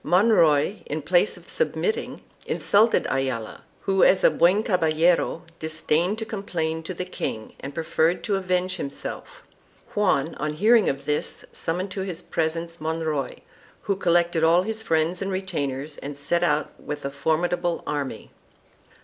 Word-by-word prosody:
Monroy, 180 -2 +4
in 150 - -2
place 175 +6 +2
of - - -16
submitting, 460 -1 -1 0.2
insulted 220 +3 +3
Ayala, 130 -5 -2 0.2
who 195 -1 +2
as 185 - +5
a - - +6
"buen 185 +5 +3
caballero" 165 -3 +2 0.2
disdained 160 +4 0
to 220 - -4
complain 170 -7 -3
to 175 +3 -6
the 180 - -4
king 110 -11 -5
and 140 +1 -8
preferred 165 +1 +1
to 205 - 0
avenge 185 -1 0
himself. 140 - -6 0.5
Juan 175 -7 +1
on 150 0 -1
hearing 215 +7 +4
of 140 0 -4
this 150 0 -1
summoned 180 +4 -1
to 190 - -4
his 180 -2 -3
presence 165 +1 -2
Monroy, 155 -3 -2 0.4
who 200 - 0
collected 170 -3 +2
all 170 +2 +5
his 220 +2 -4
friends 165 -1 0
and 195 0 -2
retainers 145 -6 -3
and 145 0 -7
set 155 +4 0
out 150 -3 +1
with 145 -1 -6
a 140 - -2
formidable 170 +4 0
army. 145 -2 -4
170 Hz, 150 wpm, -24 LUFS, 155-185 Hz, 0.5 s, a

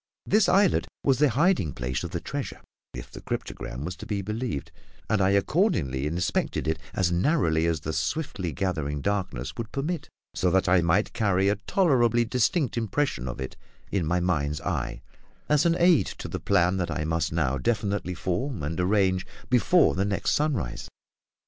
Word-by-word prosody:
This 210 -1 +3
islet 195 -1 +3 0.2
was 135 -2 +3
the 150 -1 +5
hiding 135 - +2
place 60 -1 -3
of - - -4
the - - -3
treasure, - - -5 0.4
if - - -8
the - - -9
cryptogram 65 +5 -5
was 90 +2 -4
to - - -9
be 100 -2 -2
believed; 110 - -3 0.4
and 110 - +1
I 95 - +4
accordingly 100 - +1
inspected 85 -1 -1
it 80 0 0 0.2
as 90 -2 +1
narrowly 85 - +2
as 80 -2 0
the 80 +2 -3
swiftly 100 - -2
gathering 75 -3 -2
darkness 75 -10 -2
would 115 -1 -5
permit, 155 +4 -3 0.2
so 90 - +1
that 95 +2 +2
I 90 0 +5
might 85 +6 +1
carry 100 -4 +2
a 100 - +2
tolerably 120 - +2
distinct 125 - +1
impression 115 - -1
of 60 - -5
it 65 - -5 0.4
in 90 -6 0
my 90 +2 +2
mind's 75 -5 0
eye, - - -3 0.4
as 150 +2 +3
an 165 - +3
aid 170 - +4
to - - -7
the - - -4
plan 95 -1 +2
that 90 -2 -1
I 75 - -2
must 80 -1 0
now 70 -5 0
definitely 100 - -1
form 95 - -2
and 80 +5 -3
arrange 95 0 +2 0.2
before 155 +8 +4
the 95 - 0
next 100 -1 0
sunrise. 140 - -1
95 Hz, 175 wpm, -26 LUFS, 80-120 Hz, 0.4 s, the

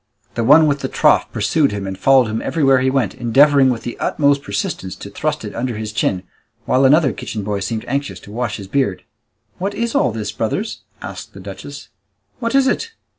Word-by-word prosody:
The 115 - -1
one 150 +6 +7
with 145 -2 +1
the - - -3
trough - - +3
pursued 125 +8 +1
him 100 -1 -4
and 95 0 -4
followed 130 +5 +4
him 110 0 -3
everywhere 135 -5 +2
he 130 +1 +2
went, 135 -1 0
endeavouring 135 +3 +4
with 120 -3 -2
the 120 - -6
utmost 140 -1 +2
persistence 100 -4 -4
to - - -10
thrust - - -2
it - - -6
under 120 -2 -3
his 110 0 -4
chin, 95 -3 0 0.4
while 130 +1 +3
another 140 -2 +4
kitchen 105 0 -5
boy 100 0 -2
seemed 110 +2 -3
anxious 140 +3 -3
to 100 - -13
wash 115 -1 -3
his 100 -2 -9
beard. 100 -4 -1 0.6
"What 200 +2 -2
is 235 +1 -2
all - - +2
this, 110 -1 -4
brothers?" - - -3 0.2
asked - - -8
the - - -9
duchess. 100 +9 -9 0.5
"What 230 +2 -1
is 275 -1 +5
it? 455 - -1
125 Hz, 205 wpm, -19 LUFS, 105-140 Hz, 0.6 s, one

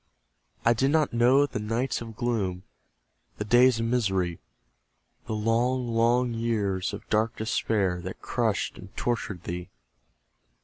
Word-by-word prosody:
I 115 - +6
did 130 +4 +1
not 155 -2 +2
know 125 +4 +5
the 130 - -4
nights 115 +5 -1
of 115 -2 -8
gloom, 105 -7 -1 0.7
The 105 - -3
days 120 +2 +5
of 115 - 0
misery; 95 -8 0 0.9
The 110 - -2
long, 120 +3 +1
long 120 +2 +2
years 105 -5 -1
of - - -8
dark 110 +1 +2
despair, 105 -5 0
That 95 +2 -7
crushed 115 -4 -1
and - - -13
tortured 105 -7 -2
thee. 90 +1 -5
115 Hz, 135 wpm, -27 LUFS, 100-120 Hz, 0.9 s, I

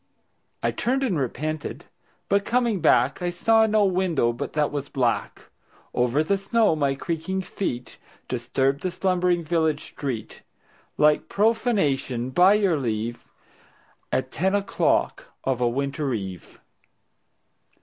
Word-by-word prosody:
I - - +2
turned 265 +3 0
and 195 - 0
repented, 155 +4 -4 0.4
but 200 0 +2
coming 235 -3 +1
back 140 -2 +3
I 175 - 0
saw 220 +5 +3
no 215 -1 +3
window 180 -10 +1
but 120 - -5
that 150 -1 +1
was 145 -1 -4
black. 125 -4 -1 0.5
Over 125 +5 +2
the 195 +5 0
snow 215 -2 +2
my 140 -3 +1
creaking 190 +4 -3
feet 125 -9 -4 0.3
Disturbed 130 +3 0
the 185 - -1
slumbering 180 -1 +1
village 160 -2 0
street 125 -7 -6 0.6
Like 150 0 +3
profanation, 155 - +1
by 185 +8 +6
your 195 -6 +2
leave, 115 -1 -3 0.9
At 130 0 -1
ten 190 +3 +1
o'clock 200 -1 0 0.2
of 130 -2 -1
a 120 - +3
winter 140 +3 -2
eve. 95 -4 -7
155 Hz, 130 wpm, -24 LUFS, 130-195 Hz, 0.9 s, by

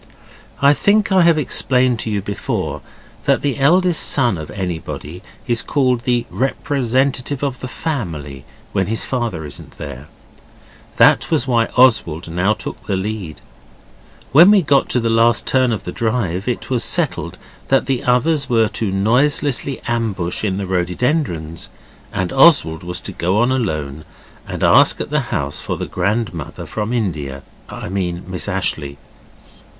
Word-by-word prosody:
I 140 +1 +7
think 205 +6 +2
I 190 -1 +5
have 170 -2 +4
explained 125 -4 +2
to 110 - -3
you 100 -2 -2
before 100 0 -3 0.4
that - - +2
the 140 -1 -1
eldest 175 +4 +3
son 125 -7 +3
of 80 -2 -7
anybody 90 -3 -5 0.2
is 120 -4 +1
called 130 -4 0
the 120 -2 +1
representative 135 0 -1
of 135 -3 -2
the 130 - -6
family 85 - -5 0.3
if 95 - 0
his 110 +1 0
father 115 - -3
isn't 75 - -11
there. 70 -1 -8 0.9
This - - +5
was 120 - +1
why 115 -3 +2
Oswald 90 -10 +3
now 95 +5 +1
took - - -8
the 100 - 0
lead. 95 -5 -5 0.9
When 170 +7 +8
we 205 -3 +5
got 140 -2 +2
to 125 - +1
the 115 - -1
last 115 +1 +3
turn 130 -2 +2
of 110 - -3
the 90 - -5
drive 110 -5 -2
it 125 +1 -3
was 125 -3 +3
settled - - +1 0.3
that 135 - +2
the 135 -2 -1
others 135 +3 +1
were 115 -3 +3
to 110 -3 -2
noiselessly 130 +6 +1
ambush 110 -8 -2
in 95 -3 -1
the 100 - -3
rhododendrons, 90 - -2 0.4
and 95 -2 -2
Oswald 135 - +4
was 90 +1 -3
to - - -7
go 90 +4 -1
on 120 +3 +2
alone 75 - -2 0.4
and - - -5
ask - - +5
at - - -5
the - - +2
house - - -2
for - - -4
the - - -4
grandmother 95 -4 -3
from 105 +1 -4
India 80 - -3 0.3
I - - -7
mean 90 -2 -3
Miss 90 -6 -3
Ashleigh. 70 -1 -2
115 Hz, 155 wpm, -18 LUFS, 90-130 Hz, 0.9 s, When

